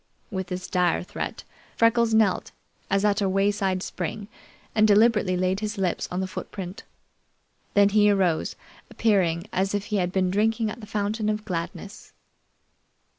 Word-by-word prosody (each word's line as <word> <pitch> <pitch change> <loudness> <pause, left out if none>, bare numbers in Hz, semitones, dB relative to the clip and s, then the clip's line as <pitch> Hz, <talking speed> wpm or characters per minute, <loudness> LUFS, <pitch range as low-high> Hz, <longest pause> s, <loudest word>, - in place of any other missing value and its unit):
With 190 -2 -3
this 180 0 -5
dire 180 -3 +1
threat, - - -5 0.3
Freckles 230 0 +3
knelt, 220 -4 +2 0.4
as 195 +1 +2
at 205 0 +2
a 195 - +1
wayside 195 -1 +1
spring, 210 -1 -5 0.4
and 215 -1 +4
deliberately 210 -3 +4
laid 185 +1 0
his 215 0 -4
lips 185 -3 -1
on 180 +1 -2
the 190 - -2
footprint. 185 0 -7 0.9
Then 200 0 +6
he 210 0 +4
arose, 185 -5 +1 0.3
appearing 180 -6 +1
as 195 +2 0
if 205 0 -2
he - - +3
had 180 -2 0
been 185 -1 +1
drinking 220 +2 +1
at 230 - -9
the 210 - -10
fountain 215 +1 -1
of 215 0 -2
gladness. 180 +1 -6
200 Hz, 155 wpm, -25 LUFS, 185-215 Hz, 0.9 s, Then